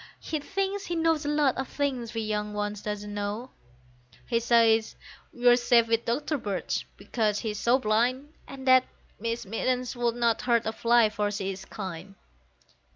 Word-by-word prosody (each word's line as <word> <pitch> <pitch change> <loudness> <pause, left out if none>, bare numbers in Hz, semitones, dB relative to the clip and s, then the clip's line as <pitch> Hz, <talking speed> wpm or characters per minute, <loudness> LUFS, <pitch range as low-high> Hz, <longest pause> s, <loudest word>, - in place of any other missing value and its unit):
He 310 - -3
thinks 390 +5 -3
he 345 - -2
knows 325 -2 +1
a - - +1
lot 295 -4 +2
of 265 - -2
things 255 -5 -3
we 225 - -1
young 210 -1 -2
ones 205 0 -3
do - - -5
not 210 0 -3
know; 205 +4 -4 0.7
He 230 - +1
says 230 -1 +3 0.4
we're 245 0 +5
safe 240 -1 +4
with 230 0 +1
Doctor 290 +5 -1
Birch, 200 -5 -3
because 210 +1 -1
he 220 - -2
is 210 - -6
so 240 +2 +3
blind, 255 +5 0
And 270 -1 -9
that 255 0 +6 0.3
Miss 230 +1 -3
Mittens 250 +5 -1
would 240 -1 0
not 235 -2 +1
hurt 235 -2 +2
a 220 - -1
fly, 235 -1 +4
for 210 -1 -1
she 200 -2 -3
is 190 0 -8
kind. 190 -1 -7
235 Hz, 180 wpm, -27 LUFS, 210-255 Hz, 0.7 s, that